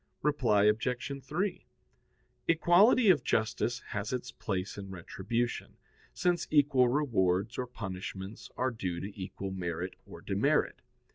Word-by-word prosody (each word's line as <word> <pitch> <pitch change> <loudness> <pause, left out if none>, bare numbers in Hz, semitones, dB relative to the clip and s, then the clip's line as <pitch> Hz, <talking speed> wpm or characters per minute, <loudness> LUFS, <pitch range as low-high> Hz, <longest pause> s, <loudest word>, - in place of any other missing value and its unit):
Reply 125 -9 +3
Obj. 125 +6 0
3: 190 +8 -2 0.8
Equality 190 +8 +5
of 150 -8 +2
justice 115 +2 0
has 105 0 -2
its 125 -1 -3
place 95 -2 -3
in 100 -1 -7
retribution, 100 +6 -3 0.3
since 175 -1 0
equal 140 -4 +4
rewards 115 -6 +1
or 125 - -2
punishments 95 -2 -6
are 130 +1 +1
due 90 -6 -3
to 100 +3 -6
equal 95 +1 -5
merit 90 -1 -3
or - - -11
demerit. - - +1
115 Hz, 125 wpm, -31 LUFS, 95-140 Hz, 0.8 s, Equality